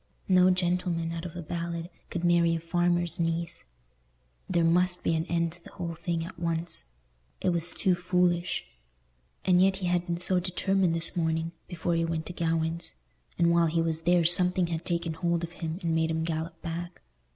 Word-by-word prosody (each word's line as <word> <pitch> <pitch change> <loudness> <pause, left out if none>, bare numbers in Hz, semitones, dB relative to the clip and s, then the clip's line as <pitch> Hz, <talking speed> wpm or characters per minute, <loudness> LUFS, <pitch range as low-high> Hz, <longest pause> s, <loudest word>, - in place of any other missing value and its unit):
No 185 -1 +5
gentleman, 175 -2 0
out 165 +1 -5
of 175 - -7
a 175 - -5
ballad, 170 +1 -4 0.2
could 175 - -4
marry 170 -1 +4
a - - -2
farmer's 175 +1 0
niece. 165 - -1 0.8
There 170 -2 +2
must 180 +2 +2
be - - +2
an 160 +2 -1
end 170 -1 0
to 170 +1 -12
the - - -14
whole 170 -1 -4
thing 165 0 -3
at 170 0 -10
once. 165 - -2 0.5
It - - +1
was 170 -1 0
too 190 -3 +2
foolish. 180 0 +1 0.8
And 180 -1 +5
yet 190 0 +4
he 190 -1 -4
had 175 0 0
been 170 -1 -1
so 180 +1 +4
determined 185 0 +1
this 165 +3 +2
morning, 160 -1 0 0.2
before 175 -1 -2
he 165 0 +1
went 165 -1 -2
to 180 - -3
Gawaine's; 165 - -1 0.4
and 170 0 +4
while 170 0 +4
he 165 +1 +1
was 165 -1 -2
there 175 +1 +3
something 180 +1 +5
had 165 -1 -4
taken 170 -2 -1
hold 170 +1 -1
of 170 - -4
him 165 -1 -5
and 165 -1 0
made 160 0 +1
him 160 0 -1
gallop 165 +1 -3
back. 170 +1 -6
170 Hz, 195 wpm, -28 LUFS, 165-175 Hz, 0.8 s, No